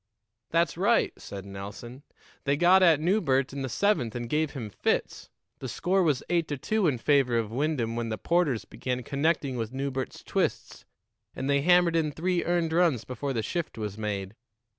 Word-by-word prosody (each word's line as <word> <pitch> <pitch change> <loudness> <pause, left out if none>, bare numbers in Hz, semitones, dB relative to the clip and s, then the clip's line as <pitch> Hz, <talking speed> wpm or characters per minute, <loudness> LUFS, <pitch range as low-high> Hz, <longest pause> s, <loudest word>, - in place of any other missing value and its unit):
"That's 165 -1 +1
right," 230 +5 +3
said 100 -1 -9
Nelson. 100 +6 -8 0.4
"They 140 0 +2
got 180 +4 +6
at 165 -5 +6
Newbert 155 -7 +1
in 140 - -4
the 130 - -3
seventh 125 - +1
and 120 -1 -4
gave 150 +4 0
him 115 -6 -6
fits. - - -1 0.3
The 130 - -5
score 185 +10 +1
was 150 -7 +1
eight 170 -2 +1
to 145 - -3
two 215 +7 0
in 140 -5 +1
favor 130 -2 +2
of 110 -2 -1
Wyndham 125 -3 -1
when 120 -1 -2
the 110 - -3
'Porters 150 - +1
began 125 +3 -4
connecting 140 -1 0
with 115 +1 -4
Newbert's 135 -1 -4
twists, - - -2 0.5
and 130 - -3
they 140 0 +2
hammered 175 +1 +4
in 155 -2 +1
three 175 +3 -1
earned 170 -2 0
runs 165 -9 +3
before 130 +2 -4
the 115 -4 -1
shift 170 - -3
was 105 -2 -4
made. 105 -2 -4
140 Hz, 185 wpm, -27 LUFS, 120-170 Hz, 0.5 s, got